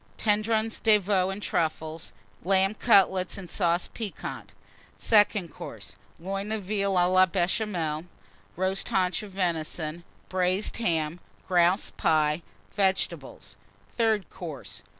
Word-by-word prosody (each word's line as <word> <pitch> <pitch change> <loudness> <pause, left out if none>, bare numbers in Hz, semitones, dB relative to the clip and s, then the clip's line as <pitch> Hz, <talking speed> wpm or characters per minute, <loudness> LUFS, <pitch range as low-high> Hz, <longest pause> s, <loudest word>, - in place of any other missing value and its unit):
Tendrons 220 +1 +1
de 220 -2 +5
Veau 190 -2 +1
and 195 +2 -5
Truffles. 160 -1 -2 0.3
Lamb 195 +2 +3
Cutlets 195 -5 +3
and 190 -2 -8
Sauce 175 +1 0
Piquante. 220 -4 -6 0.5
SECOND 205 -6 +3
COURSE. 105 -3 -9 0.2
Loin 195 +4 -4
of 220 -2 -2
Veal 200 0 0
à 175 -1 +4
la 185 0 +6
Béchamel. 175 -3 -1 0.5
Roast 190 +2 -1
Haunch 190 -5 +1
of 210 - -9
Venison. 170 -2 -2 0.2
Braised 185 +2 0
Ham. 165 -6 0 0.3
Grouse 180 +1 +3
Pie. 155 0 +1 0.3
Vegetables. 190 -2 -1 0.4
THIRD 220 -5 +1
COURSE. 125 - -8
185 Hz, 115 wpm, -27 LUFS, 170-205 Hz, 0.5 s, la